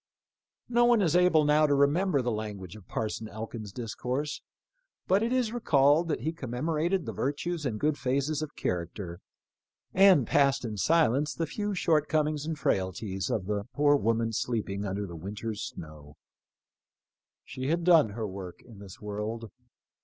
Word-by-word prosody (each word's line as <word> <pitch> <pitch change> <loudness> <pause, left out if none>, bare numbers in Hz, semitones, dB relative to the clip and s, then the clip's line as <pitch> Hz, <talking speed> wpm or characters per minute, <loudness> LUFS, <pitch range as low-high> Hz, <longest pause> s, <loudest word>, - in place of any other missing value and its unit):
No 240 0 +3
one 240 -1 +5
is 165 -2 +2
able 180 -4 +5
now 150 +1 +4
to 145 - +2
Temember 145 +1 +2
the 120 - 0
language 105 -4 -5
of 105 -4 -14
Parson 110 0 -3
Elkin's 110 -1 -7
discourse, 125 +6 -4 0.6
but 195 +2 +3
it 230 +2 0
is 250 -4 +1
recalled 155 - +3
that 150 -7 -2
he 160 +6 -2
commemorated 160 +6 -1
the - - -4
virtues 150 +3 -2
and 110 -4 -3
good 150 0 0
phases 140 +4 0
of 155 -1 -6
character, 85 0 -4 0.7
and 185 -8 +6
passed 140 0 +2
in 110 -2 -4
silence 145 - +2
the 165 - -1
few 205 +5 -3
short 155 -4 +2
comings 155 -1 0
and 160 -1 -3
frailties 95 -2 -1
of 95 - -1
the 100 0 -2
poor 145 0 +4
woman 115 -3 0
sleeping 105 -3 -2
under 100 +1 -3
the 85 -3 -8
winter's 105 +5 -5
snow. 75 -2 -9 1.3
She 130 0 -5
had 170 +3 0
done 165 -9 +6
her 110 +1 -4
work 95 -2 -8
in 115 -5 -14
this 100 -2 -11
world. 105 +1 -5
130 Hz, 160 wpm, -29 LUFS, 105-155 Hz, 1.3 s, and